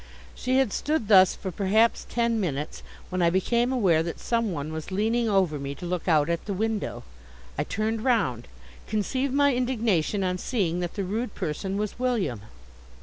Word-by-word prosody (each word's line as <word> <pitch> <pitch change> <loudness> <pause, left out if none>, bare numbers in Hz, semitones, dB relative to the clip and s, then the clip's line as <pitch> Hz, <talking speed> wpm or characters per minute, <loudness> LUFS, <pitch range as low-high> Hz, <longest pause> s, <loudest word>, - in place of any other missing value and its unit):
She 255 +1 0
had 265 -6 +2
stood 295 -8 -1
thus 190 -3 +7
for 190 - -5
perhaps 210 +5 +2
ten 235 -1 +1
minutes, 150 -6 -3 0.3
when 185 0 -1
I 170 - +5
became 235 +7 +1
aware 190 -11 +3
that 170 +1 -4
some 230 -3 0
one 155 -1 -4
was 160 -1 -5
leaning 225 +4 +1
over 185 -7 +2
me, 140 0 -5
to 175 - -8
look 180 0 -3
out 155 -4 +4
at 170 0 -2
the 200 - -3
window. 210 - -2 0.5
I 145 - -1
turned 215 +4 -2
round. 180 - +1 0.4
Conceive 255 +6 -1
my 285 0 +3
indignation 220 -7 0
on 180 0 -1
seeing 180 -8 -1
that 175 -1 -4
the 200 - -2
rude 215 +4 -3
person 190 +6 -3
was 210 +2 -3
William. 210 - 0
200 Hz, 180 wpm, -26 LUFS, 170-230 Hz, 0.5 s, thus